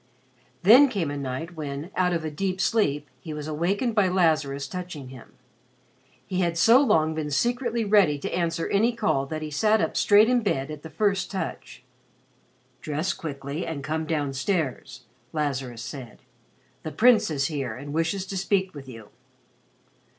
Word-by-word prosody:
Then 245 +9 +8
came 180 - -2
a - - -4
night 140 +5 -5
when, 150 +2 -5
out 180 -1 +2
of 165 -2 -1
a 155 - -3
deep 185 +4 -2
sleep, 150 -10 +1
he 155 +3 -7
was 150 0 -6
awakened 190 - 0
by 205 -3 +3
Lazarus 155 -6 +1
touching 175 -7 -7
him. 130 -3 -13 0.9
He 185 - -3
had 170 -2 0
so 230 +9 +6
long 160 - +3
been 155 -1 -3
secretly 235 - 0
ready 200 -8 +4
to 140 - -5
answer 170 -1 -1
any 225 +4 +2
call 200 -12 0
that 155 +1 -4
he 155 - -5
sat 215 +9 +3
up - - -1
straight 210 +1 +5
in 250 0 +3
bed 145 -9 -1
at 150 -1 -8
the 160 - -9
first 200 +1 0
touch. 190 -9 -6 1.0
"Dress 155 +5 -2
quickly 140 0 -5
and 155 -4 -5
come 155 +1 -2
down 145 -4 -1
stairs," 135 -4 -2 0.3
Lazarus 135 -6 -3
said. 130 -2 -9 0.6
"The 155 - -6
Prince 240 +1 +4
is 140 -3 0
here 135 -7 -3
and 145 +3 -8
wishes 165 +4 -1
to 195 0 -5
speak 190 0 0
with 140 -3 -10
you." 115 -4 -11
160 Hz, 170 wpm, -25 LUFS, 145-195 Hz, 1.0 s, Then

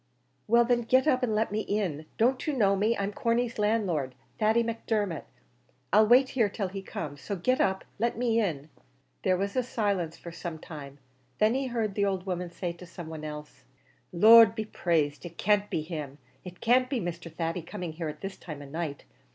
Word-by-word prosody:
"Well, 235 +2 +5
then, 240 0 +2
get 255 +3 +3
up 255 -4 +3
and 230 -4 0
let 220 0 +1
me 210 - -1
in. 185 -8 -2
Don't 255 +5 +2
you 305 - +1
know 200 -4 +4
me? 215 +4 +1
I'm 200 +1 -2
Corney's 235 +2 0
landlord, 190 - 0 0.2
Thady 220 +2 +3
Macdermot. 215 -6 -2 0.7
I'll 215 +1 +6
wait 255 +3 +6
here 230 -6 +2
till 200 -1 -3
he 195 +1 -6
comes; 145 -6 -6
so 200 - -3
get 255 +8 +1
up 190 0 +1
and - - -31
let 235 +1 0
me 230 -1 +2
in." 160 -8 -2 0.5
There 185 - +2
was 200 +1 -2
a 255 - +3
silence 200 -9 -1
for 170 - -9
some 170 -1 -6
time; 145 -3 -9 0.4
then 215 +2 +3
he 265 +1 -1
heard 225 -4 -1
the 200 0 +1
old 190 -2 -1
woman 180 -2 -3
say 175 0 -4
to 175 +1 -12
some 170 -2 -9
one 160 -1 -7
else, 150 -1 -8 0.5
"The 175 - -8
Lord 225 +3 +9
be 220 -1 -3
praised! 150 -8 0
It 170 -1 -9
can't 205 -1 +2
be 155 - -1
him 150 -4 -6 0.3
it 180 -1 -10
can't 250 +2 +3
be 260 -3 0
Mr. 170 -2 -5
Thady 165 +2 -2
coming 175 -1 -6
here 165 0 -4
at 150 0 -9
this 195 0 -6
time 150 -4 -8
of 140 - -12
night. 160 -3 -4
195 Hz, 210 wpm, -28 LUFS, 165-225 Hz, 0.7 s, Lord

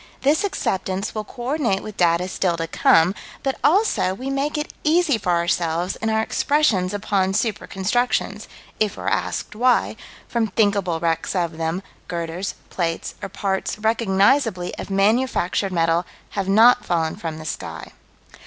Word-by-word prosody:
This 295 +6 +3
acceptance 190 - -2
will 215 - -3
co 240 +4 -10
ordinate 245 -7 0
with 215 - -8
data 175 0 +2
still 180 -2 0
to 165 - -2
come, 165 +2 +4 0.3
but, 270 -1 -1
also, 350 - +3
we 260 +6 -4
make 280 +3 -1
it 300 - -4
easy 320 -2 +3
for 180 -3 0
ourselves 170 +1 0
in 220 - -2
our 220 0 +2
expressions 225 -11 +1
upon 195 -2 0
super 220 -1 -1
constructions, 230 +6 -1 0.3
if 215 -2 0
we're - - -6
asked - - -2
why, 245 +3 +2 0.3
from 230 -2 0
thinkable 200 -5 +1
wrecks 165 +3 -1
of 170 -3 -1
them, 165 +4 -2 0.2
girders, 170 +2 -4 0.2
plates, 165 -2 -2
or - - -5
parts 190 +1 -2
recognizably 220 -1 +2
of - - -6
manufactured 200 -1 +1
metal 165 0 +1 0.2
have 195 -1 -2
not 225 +5 +6
fallen 165 -2 0
from 160 -2 -5
the 155 - -9
sky. 150 - -6
195 Hz, 155 wpm, -22 LUFS, 175-235 Hz, 0.3 s, not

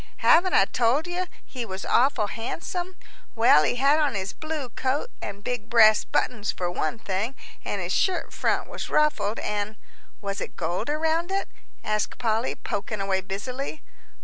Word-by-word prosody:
"Haven't 360 +3 +6
I 195 - +6
told 245 +8 +2
you 360 +1 -2 0.2
he 250 -3 -5
was 190 -3 -6
awful 250 -3 +3
handsome? 350 - -4 0.4
Well, 225 -9 +6
he 155 - +1
had 280 +4 +4
on 290 -7 +1
his 195 0 -3
blue 310 -5 -4
coat 270 - -1
and 200 +1 -6
big 230 -2 -3
brass 220 -3 +6
buttons 220 -4 0
for 175 -1 -3
one 155 +2 -1
thing, 220 +4 -2 0.3
an' - - -2
his - - -2
shirt 375 -2 +1
front - - 0
was - - -6
ruffled. 300 -8 +2
And 210 +1 -2 0.2
" - - -28
"Was 200 0 -4
it - - -6
gold 175 - -2
around 320 +3 +1
it?" 390 0 0 0.4
asked 215 0 -1
Polly, 225 0 0
poking 205 +1 -4
away 195 -1 0
busily. 250 +10 -5
235 Hz, 170 wpm, -26 LUFS, 205-300 Hz, 0.4 s, Haven't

